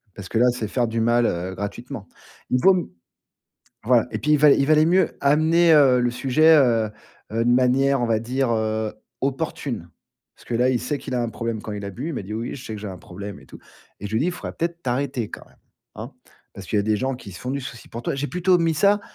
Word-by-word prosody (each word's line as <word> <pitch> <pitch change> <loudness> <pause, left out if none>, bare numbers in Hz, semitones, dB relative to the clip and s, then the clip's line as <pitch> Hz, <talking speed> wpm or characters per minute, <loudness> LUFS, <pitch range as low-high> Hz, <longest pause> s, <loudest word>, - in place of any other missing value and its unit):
parce 95 -2 -9
que 115 - -1
là 125 - +5
c'est 120 -3 -4
faire 120 +1 0
du 115 +1 -2
mal, 120 +1 +3
heu, 90 -1 -2
gratuitement. 105 +2 -6 0.4
Il 125 - +2
vaut 190 +5 +6
m 180 - -2 1.0
voilà, 120 -1 +3
et - - -2
puis 150 - +1
il 150 - +5
va 150 0 +6
il 140 0 +4
valait 155 0 +5
mieux 185 +3 +2
amener, 160 +4 +4
heu, 130 -4 +5
le 120 0 +1
sujet 145 +6 +4
heu 115 -6 +3 0.4
heu, 115 +1 0
de 120 - +3
manière 130 +2 +3
on 120 - +1
va 115 -1 +2
dire, 125 +2 -1
heu, 110 -1 -1 0.3
opportune. 135 - -3 0.5
Parce - - -19
que 120 - -2
là 125 +2 +3
il 125 - +1
sait 140 +4 -2
qu'il 130 - -6
a 120 - 0
un 120 - -1
problème 115 -2 -4
quand 110 - -6
il 100 -1 -5
a 100 - -4
bu. 125 - -6
Il 165 - -4
m'a - - -4
dit: 105 +3 -7
«Oui 115 +2 -4
je 130 - -9
sais 110 - -5
que 105 - -7
j'ai 105 - -6
un 95 -2 -8
problème 100 -1 -9
et 65 - -18
tout.» - - -13 0.4
et 105 - -5
je 105 - -8
lui - - +3
ai - - +1
dit: 180 - +1
«Faudrait 180 - -7
peut-être 170 +1 -4
t'arrêter 125 -3 -2
quand - - -9
même, - - -25 0.4
hein? 120 +6 -7 0.4
Parce 100 - -9
qu'il - - -2
y - - +4
a - - -1
des 110 +1 +1
gens 130 +1 -1
qui 100 -6 -11
se 95 - -10
font 125 0 -4
du 140 +1 -2
souci 120 -2 -9
pour 115 +1 -7
toi». - - -2
J'ai 140 +1 -2
plutôt 180 0 +2
mis 165 -1 +1
ça 200 +6 +3
125 Hz, 270 wpm, -23 LUFS, 110-140 Hz, 1.0 s, vaut